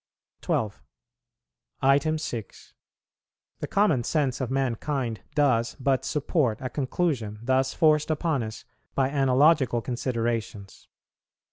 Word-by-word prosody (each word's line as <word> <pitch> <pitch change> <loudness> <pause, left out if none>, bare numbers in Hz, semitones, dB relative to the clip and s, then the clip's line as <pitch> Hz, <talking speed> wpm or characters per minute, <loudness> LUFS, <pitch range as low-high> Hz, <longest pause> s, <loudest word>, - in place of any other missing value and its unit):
12. 105 -2 -1 1.4
6. 120 -9 -7 0.9
The - - -4
common 175 - +2
sense 140 -2 0
of 130 - -2
mankind 130 -2 -2
does 120 -6 +2
but 135 0 +1
support 145 - 0
a 130 - -5
conclusion 130 -7 -1
thus 130 +1 +1
forced 155 -2 +3
upon 155 -3 0
us 110 0 -7 0.3
by 135 -1 +2
analogical 135 -1 +3
considerations. 115 -5 -3
130 Hz, 100 wpm, -26 LUFS, 115-150 Hz, 1.4 s, forced